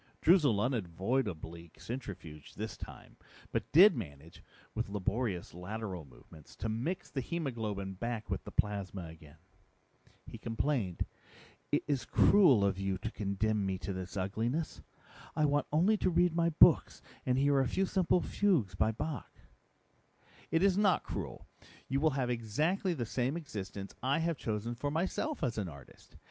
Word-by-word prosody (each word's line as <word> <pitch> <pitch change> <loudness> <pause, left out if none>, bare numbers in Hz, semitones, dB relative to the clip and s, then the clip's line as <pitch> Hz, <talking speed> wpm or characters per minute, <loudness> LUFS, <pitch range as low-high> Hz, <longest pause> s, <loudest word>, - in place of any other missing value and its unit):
Droozle 150 - +5
unavoidably 95 - -2
centrifuged 95 - -7
this - - -4
time, - - -11 0.3
but - - -2
did 180 +3 +8
manage, 80 - -8 0.3
with - - -2
laborious 100 -1 -2
lateral 95 -1 -5
movements, 75 +3 -16
to 110 - -3
mix 125 +12 -3
the 135 - -2
hemoglobin 110 - -3
back 115 +3 -4
with - - -3
the - - -8
plasma 100 -2 -1
again. 80 -2 -13 0.9
He - - -9
complained, 115 - -1 0.7
"It - - +2
is 140 -3 -1
cruel 145 - +6
of 95 -1 0
you 95 -1 -1
to - - -4
condemn 105 +1 0
me 95 -1 -1
to 95 +1 -4
this 95 +2 -6
ugliness. 110 - -2 0.5
I 155 - +3
want 145 0 +1
only 180 +8 +4
to 185 - +1
read 175 -1 +3
my 170 0 +3
books 155 - +5 0.2
and 125 0 +1
hear 140 0 +4
a 135 - +2
few 190 +10 +1
simple 180 -1 +2
fugues 165 - +1
by 110 +4 +2
Bach." 140 +6 -5 1.1
"It 165 +2 +2
is 195 0 +4
not 200 -3 +3
cruel. - - -5 0.4
You 135 +1 0
will 155 +2 +4
have 125 -2 0
exactly 155 - 0
the 120 -5 -2
same 130 +7 -1
existence 100 - -6
I 135 +3 +2
have 165 -1 0
chosen 110 +1 -2
for 130 +5 -3
myself 185 - -1
as 120 -5 0
an 95 -4 -2
artist. 70 -4 -14
115 Hz, 155 wpm, -33 LUFS, 95-150 Hz, 1.1 s, did